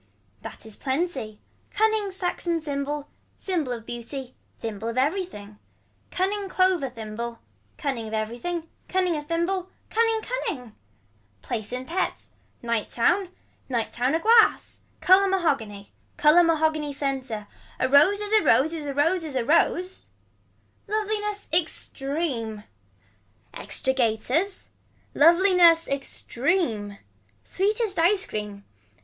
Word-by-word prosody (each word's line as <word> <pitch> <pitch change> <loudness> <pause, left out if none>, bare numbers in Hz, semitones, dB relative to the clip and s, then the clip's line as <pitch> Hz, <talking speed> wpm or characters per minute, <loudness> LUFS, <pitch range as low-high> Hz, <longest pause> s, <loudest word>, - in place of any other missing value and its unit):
That - - -9
is 220 -2 -8
plenty. 265 -6 -2 0.3
Cunning 435 -1 +1
saxon 355 -2 -1
symbol. 290 -1 -3 0.3
Symbol 335 -9 -2
of 230 -2 -5
beauty. 245 +2 -6 0.2
Thimble 220 -1 -5
of 230 +1 -4
everything. 260 - -2 0.5
Cunning 390 +1 -1
clover 370 -7 +2
thimble. 230 0 -6 0.4
Cunning 265 -8 -3
of 215 - -8
everything. 245 +11 -3 0.2
Cunning 370 -2 +1
of 295 -1 -5
thimble. 350 +3 -1 0.2
Cunning 450 0 +2
cunning. 340 - -4 0.7
Place 220 -3 -4
in 255 +1 -4
pets. 365 +6 -3 0.3
Night 235 -2 -1
town. 350 +10 +1 0.4
Night 235 -3 -2
town 255 +5 +1
a - - +1
glass. 450 +4 +4 0.2
Color 380 +2 +6
mahogany. 270 - -1 0.3
Color 310 +4 +6
mahogany 315 -2 +1
center. 265 -6 -3 0.3
Rose 290 +10 +4
is 415 0 -5
a 435 -1 +5
rose 310 +5 +4
is 305 -3 -5
a 280 - -4
rose 330 +5 +2
is 300 -4 -6
a 250 -3 0
rose. 355 +5 +1 0.8
Loveliness 420 -1 -2
extreme. 275 -8 -1 0.9
Extra 265 - -2
gaiters. 260 - 0 0.4
Loveliness 340 0 +5
extreme. 260 - -1 0.5
Sweetest 415 0 0
ice 375 +4 +3
cream. 210 -1 -6
305 Hz, 115 wpm, -25 LUFS, 240-370 Hz, 0.9 s, Color